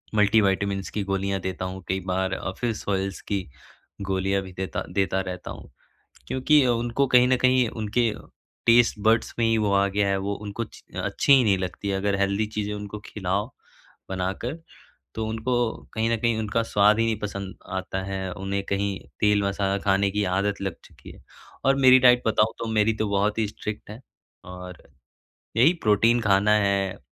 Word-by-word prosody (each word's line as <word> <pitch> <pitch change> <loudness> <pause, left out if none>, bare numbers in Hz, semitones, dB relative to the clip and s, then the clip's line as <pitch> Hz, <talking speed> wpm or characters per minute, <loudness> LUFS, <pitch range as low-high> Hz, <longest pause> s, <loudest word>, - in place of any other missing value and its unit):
Multivitamins 100 -2 +2
की 105 - -3
गोलियाँ 95 0 -1
देता 95 0 -4
हूँ 95 0 -6
कई 95 +1 -1
बार 95 0 0
अ, 95 - -3
फिश 115 -3 -2
ऑयल्स 95 -1 -2
की 95 -3 -3 0.5
गोलियाँ 95 0 0
भी 95 - -10
देता 95 +1 -4
देता 95 -1 +1
रहता 90 -2 -6
हूँ - - -11 0.6
क्योंकि 135 +2 +3
उनको 120 +3 +1
कहीं 125 0 +5
न 130 - +4
कहीं 130 -1 +4
उनके 110 +2 0 0.6
टेस्ट 115 -2 +5
बड्स 110 +1 +3
में 115 - +2
ही 115 0 +2
वो 105 -2 +1
आ 100 0 +3
गया 100 0 0
है 100 - +1
वो 100 +1 -2
उनको 100 +3 -4
च - - -16
अच्छी - - +1
ही 135 -2 +6
नहीं 100 -3 +3
लगती 95 +2 -4
है 100 - 0
अगर 100 0 0
हेल्दी 100 +2 +1
चीज़ें 105 0 -2
उनको 105 0 -6
खिलाओ 100 +2 -2 0.6
बनाकर, 95 +7 -3 0.6
तो 110 0 -3
उनको 110 +3 -2 0.4
कहीं 115 +1 0
न 115 - +2
कहीं 115 0 +1
उनका 110 +1 0
स्वाद 105 0 +3
ही 115 - +3
नहीं 110 -2 -1
पसंद 100 -2 -5 0.2
आता 95 0 -3
है, 95 -1 -4
उन्हें 100 0 -3
कहीं 100 0 -1 0.2
तेल-मसाला 100 -2 +1
खाने 100 0 +2
की 105 +1 -1
आदत 100 +1 -1
लग 95 -3 -3
चुकी - - -15
है। - - -17 0.4
और 135 0 +4
मेरी 130 0 +9
डाइट 125 -1 +6
बताओ 110 0 +2
तो 115 - -4
मेरी 110 0 +2
तो 110 0 -1
बहुत 100 +2 +1
ही 110 - +2
स्ट्रिक्ट 105 0 -7
है 110 +3 -9 0.4
और 90 -1 -10 0.8
यही 150 +10 +6
प्रोटीन 115 +3 +3
खाना 100 -1 +3
है, 100 -1 0
100 Hz, 180 wpm, -25 LUFS, 95-115 Hz, 0.8 s, मेरी